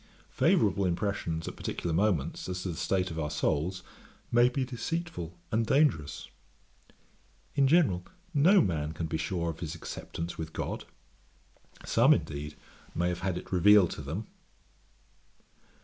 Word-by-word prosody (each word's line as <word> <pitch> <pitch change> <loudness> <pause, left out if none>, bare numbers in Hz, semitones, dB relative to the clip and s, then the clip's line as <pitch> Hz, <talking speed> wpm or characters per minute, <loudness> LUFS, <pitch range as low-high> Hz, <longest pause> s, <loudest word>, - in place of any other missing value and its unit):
Favourable 100 - +3
impressions 85 -3 -1
at - - -5
particular 85 - -3
moments, 85 -4 0
as 90 0 -3
to 95 - -3
the 85 - -4
state 95 +1 0
of 80 - -4
our 75 -2 -1
souls, 85 +6 -1 0.5
may 120 +1 +5
be 130 +1 -1
deceitful 125 - -4
and 110 +1 +2
dangerous. 105 - +2 1.3
In 140 -1 +4
general 135 - +3 0.3
no 175 +7 +6
man 80 -3 -1
can 80 +1 -3
be 80 - -2
sure 85 +1 -1
of 80 - -12
his 85 -1 -4
acceptance 85 0 -6
with 80 0 -5
God; - - -4 1.0
some, - - +5
indeed, 75 +1 -5 0.4
may 90 +1 +1
have 90 -1 -3
had 95 -1 -1
it - - -9
revealed 95 0 +6
to - - -6
them. 80 +10 -4
90 Hz, 145 wpm, -30 LUFS, 80-110 Hz, 1.3 s, no